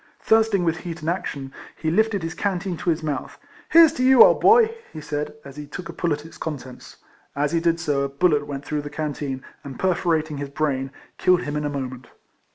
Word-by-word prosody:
Thirst 220 Hz, -1 st, +3 dB
ing 185 Hz, -, +1 dB
with 165 Hz, -1 st, 0 dB
heat 165 Hz, -1 st, -7 dB
and 155 Hz, -, -2 dB
action, 140 Hz, -7 st, -5 dB, 0.2 s
he 160 Hz, -, -2 dB
lifted 215 Hz, 0 st, +1 dB
his 165 Hz, 0 st, -3 dB
can 190 Hz, +1 st, -1 dB
teen 180 Hz, 0 st, -4 dB
to 175 Hz, -, -2 dB
his 160 Hz, -1 st, 0 dB
mouth; 145 Hz, -4 st, -4 dB, 0.3 s
"Here's 330 Hz, -1 st, +7 dB
to 255 Hz, -, -2 dB
you, 260 Hz, -1 st, +8 dB
old -, -, +4 dB
boy," 455 Hz, 0 st, +6 dB, 0.2 s
he 155 Hz, -, -8 dB
said, 150 Hz, 0 st, -4 dB
as 140 Hz, +1 st, -11 dB
he 150 Hz, -1 st, -7 dB
took 170 Hz, +4 st, -8 dB
a -, -, -6 dB
pull 170 Hz, 0 st, -1 dB
at 150 Hz, +1 st, -2 dB
its 165 Hz, -, -13 dB
contents. 130 Hz, -5 st, -7 dB, 0.4 s
As 145 Hz, +1 st, 0 dB
he 170 Hz, -, +2 dB
did 165 Hz, 0 st, +1 dB
so 145 Hz, -5 st, 0 dB
a 140 Hz, -, -1 dB
bullet 145 Hz, +1 st, +1 dB
went 140 Hz, -1 st, -6 dB
through 150 Hz, -1 st, -2 dB
the 145 Hz, -, -7 dB
can 150 Hz, 0 st, -3 dB
teen, 135 Hz, -2 st, -5 dB, 0.2 s
and 135 Hz, -2 st, -8 dB
perforating 165 Hz, -4 st, 0 dB
his 140 Hz, -1 st, -5 dB
brain, 140 Hz, -2 st, -1 dB, 0.3 s
killed 180 Hz, -1 st, +3 dB
him 145 Hz, 0 st, -4 dB
in 150 Hz, 0 st, -2 dB
a -, -, 0 dB
moment. 130 Hz, -3 st, -5 dB
155 Hz, 235 wpm, -23 LUFS, 145-175 Hz, 0.4 s, you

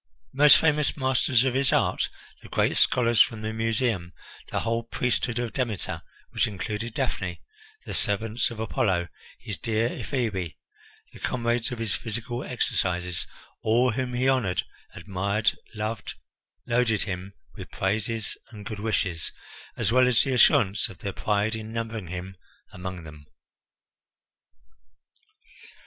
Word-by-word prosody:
The 135 Hz, -, -11 dB
most 150 Hz, 0 st, +9 dB
famous 150 Hz, -2 st, +2 dB
masters 130 Hz, -2 st, +3 dB
of 130 Hz, -2 st, +1 dB
his 135 Hz, 0 st, +2 dB
art, -, -, +2 dB, 0.3 s
the -, -, -13 dB
great -, -, +2 dB
scholars 120 Hz, -2 st, +4 dB
from 110 Hz, -2 st, +2 dB
the 110 Hz, 0 st, -2 dB
Museum, 110 Hz, -5 st, 0 dB, 0.4 s
the -, -, -1 dB
whole 115 Hz, 0 st, 0 dB
priesthood 120 Hz, 0 st, -1 dB
of 120 Hz, -2 st, -2 dB
Demeter, 120 Hz, -7 st, -2 dB, 0.3 s
which -, -, +2 dB
included 105 Hz, +3 st, -4 dB
Daphne, -, -, -2 dB, 0.5 s
the -, -, -5 dB
servants 110 Hz, +3 st, +1 dB
of 115 Hz, -2 st, -8 dB
Apollo, 95 Hz, -6 st, 0 dB, 0.3 s
his 110 Hz, -4 st, -5 dB
dear 115 Hz, 0 st, +1 dB
Ephebi, 105 Hz, -, -2 dB, 0.6 s
the -, -, -12 dB
comrades 120 Hz, -1 st, 0 dB
of 125 Hz, -, -3 dB
his 115 Hz, -3 st, -1 dB
physical 120 Hz, +2 st, -4 dB
exercises 90 Hz, -7 st, -1 dB, 0.3 s
all 120 Hz, +3 st, +3 dB
whom 125 Hz, +1 st, -2 dB
he 130 Hz, +2 st, +2 dB
honoured, 110 Hz, -9 st, +2 dB, 0.3 s
admired, 100 Hz, +3 st, 0 dB, 0.2 s
loved 110 Hz, +1 st, -3 dB, 0.5 s
loaded 120 Hz, -3 st, +2 dB
him 95 Hz, 0 st, -5 dB, 0.2 s
with -, -, -9 dB
praises 110 Hz, +3 st, -1 dB
and 105 Hz, -3 st, -10 dB
good 105 Hz, -1 st, -5 dB
wishes, 100 Hz, -6 st, 0 dB, 0.5 s
as 110 Hz, -3 st, +1 dB
well 125 Hz, +1 st, +5 dB
as 125 Hz, -3 st, +4 dB
the 135 Hz, -, 0 dB
assurance 120 Hz, -5 st, +5 dB
of 95 Hz, -, -11 dB
their 100 Hz, +3 st, -4 dB
pride 105 Hz, +3 st, 0 dB
in 110 Hz, 0 st, -6 dB
numbering 115 Hz, -4 st, -4 dB
him 95 Hz, +2 st, -6 dB, 0.4 s
among 90 Hz, -1 st, -6 dB
them. 75 Hz, -2 st, -12 dB
110 Hz, 140 wpm, -26 LUFS, 100-120 Hz, 0.6 s, most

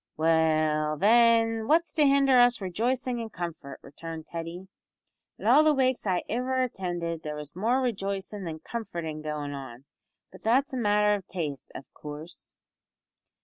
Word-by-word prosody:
"Well, 155 Hz, -1 st, +2 dB
then, 225 Hz, +2 st, +4 dB
what's 335 Hz, +2 st, +2 dB
to 300 Hz, -3 st, +4 dB
hinder 275 Hz, -2 st, +5 dB
us 245 Hz, 0 st, +5 dB
rejoicin' 240 Hz, +6 st, -1 dB
in 225 Hz, -1 st, -5 dB
comfort?" 170 Hz, -7 st, -6 dB
returned 160 Hz, +2 st, -8 dB
Teddy. 170 Hz, +3 st, -7 dB, 0.7 s
"At -, -, -10 dB
all 305 Hz, -, +6 dB
the 310 Hz, -1 st, +4 dB
wakes 260 Hz, -4 st, +1 dB
I 180 Hz, -2 st, +1 dB
ivver 255 Hz, +3 st, 0 dB
attinded 175 Hz, -6 st, -4 dB
there 150 Hz, -1 st, -5 dB
was 150 Hz, 0 st, -9 dB
more 230 Hz, +8 st, +1 dB
rejoicin' 200 Hz, -4 st, -3 dB
than 160 Hz, -1 st, -6 dB
comfortin' 170 Hz, -8 st, -5 dB
goin' 150 Hz, -1 st, -4 dB
on; 135 Hz, -2 st, -9 dB, 0.5 s
but -, -, -14 dB
that's 260 Hz, +5 st, +2 dB
a -, -, -2 dB
matter 210 Hz, -2 st, +3 dB
of 195 Hz, -3 st, -4 dB
taste, 150 Hz, -7 st, -5 dB
av 135 Hz, -, -8 dB
coorse." 150 Hz, +3 st, -10 dB
190 Hz, 150 wpm, -27 LUFS, 155-240 Hz, 0.7 s, all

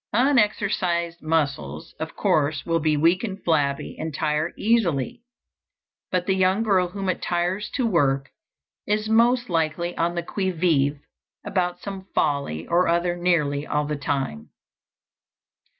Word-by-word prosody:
Unexercised 205 Hz, -8 st, +1 dB
muscles, 140 Hz, -, -2 dB
of -, -, -5 dB
course, 145 Hz, -1 st, +1 dB
will 165 Hz, -1 st, +1 dB
be 155 Hz, -1 st, +1 dB
weak 170 Hz, +6 st, +3 dB
and 200 Hz, -4 st, -5 dB
flabby 145 Hz, -4 st, 0 dB
and 160 Hz, 0 st, -3 dB
tire 155 Hz, +2 st, -1 dB
easily. 220 Hz, -, +1 dB, 0.9 s
But 180 Hz, -1 st, 0 dB
the 190 Hz, -, +2 dB
young 190 Hz, +3 st, +2 dB
girl 190 Hz, -5 st, +3 dB
whom 195 Hz, +2 st, -5 dB
it 185 Hz, -, -1 dB
tires 180 Hz, +4 st, -1 dB
to 255 Hz, -, +1 dB
work 140 Hz, -9 st, +1 dB, 0.6 s
is 215 Hz, +1 st, 0 dB
most 235 Hz, +2 st, +3 dB
likely 165 Hz, 0 st, -1 dB
on 170 Hz, +1 st, 0 dB
the 170 Hz, -, -2 dB
qui 190 Hz, +2 st, -2 dB
vive 150 Hz, -5 st, +1 dB, 0.4 s
about 180 Hz, -2 st, -1 dB
some 195 Hz, -1 st, -7 dB
folly 140 Hz, -, 0 dB
or 175 Hz, +2 st, +2 dB
other 175 Hz, +1 st, +1 dB
nearly 155 Hz, -5 st, +1 dB
all 150 Hz, 0 st, 0 dB
the 150 Hz, +1 st, -2 dB
time. 135 Hz, -, -3 dB
170 Hz, 140 wpm, -24 LUFS, 150-190 Hz, 0.9 s, weak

